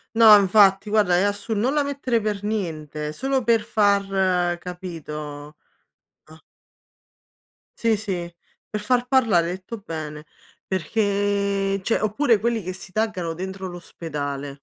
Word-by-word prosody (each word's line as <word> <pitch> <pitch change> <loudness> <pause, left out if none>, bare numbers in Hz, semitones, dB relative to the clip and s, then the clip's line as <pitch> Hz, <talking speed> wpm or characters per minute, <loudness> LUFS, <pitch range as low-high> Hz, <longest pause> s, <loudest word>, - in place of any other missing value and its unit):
No, 220 -2 +9
infatti 195 +1 +4
guarda, 205 -5 +3
è - - +3
assur 205 +2 -1
non 240 +6 +1
la 295 - +3
mettere 270 -4 -1
per 210 -2 -2
niente, 155 -7 -3
solo 265 +2 -1
per 230 -2 +3
far 195 -4 +1
capito? 150 -5 -7 0.7
Ah 160 0 -17 1.4
Sì, 230 -1 +2
sì, 185 -5 -4 0.4
per 210 -1 -4
far 245 +3 +1
parlare, 225 -11 +3
hai - - -3
detto 190 +5 -8
bene, 155 -5 -7 0.4
perché, 200 0 0
cioè 225 - 0
oppure 220 +2 +2
quelli 230 0 0
che 185 +1 -5
si 190 0 -10
taggano 185 -6 -1
dentro 190 +2 -6
l'ospedale. 145 -5 -6
195 Hz, 130 wpm, -23 LUFS, 170-215 Hz, 1.4 s, No